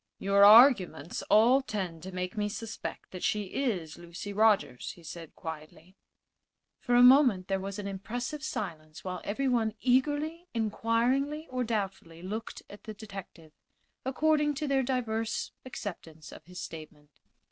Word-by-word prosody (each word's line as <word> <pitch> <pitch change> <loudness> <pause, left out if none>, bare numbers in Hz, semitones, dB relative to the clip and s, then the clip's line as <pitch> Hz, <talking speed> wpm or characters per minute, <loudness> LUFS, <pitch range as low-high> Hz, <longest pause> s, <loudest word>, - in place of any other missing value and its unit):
"Your 200 +1 +3
arguments 210 - +6
all 240 +6 +6
tend 190 -10 -4
to 190 +3 -8
make 180 0 -4
me 210 -1 -1
suspect 225 +1 -7
that 185 - -7
she 210 -1 0
is 185 - -3
Lucy 175 +4 -7
Rogers," 210 - +2
he 170 - -17
said, 165 0 -9
quietly. 160 +3 -9 0.8
For 245 - 0
a 245 - +7
moment 250 -8 +6
there 195 -1 0
was 195 +1 -5
an 205 -1 -5
impressive 240 +9 -5
silence, 155 - -5
while 180 -1 -5
everyone 225 -1 0
eagerly, 295 +7 +1
inquiringly 235 +7 0
or 255 -1 -1
doubtfully 195 -7 -4
looked 215 +4 -6
at 205 - -13
the 215 -2 -7
detective, 195 -6 -10 0.5
according 295 +2 +1
to 300 +1 -3
their 275 -1 +2
diverse 235 -4 -2
acceptance 165 - -8
of 155 - -13
his 180 +1 -10
statement. 155 -3 -9
210 Hz, 145 wpm, -29 LUFS, 180-250 Hz, 0.8 s, a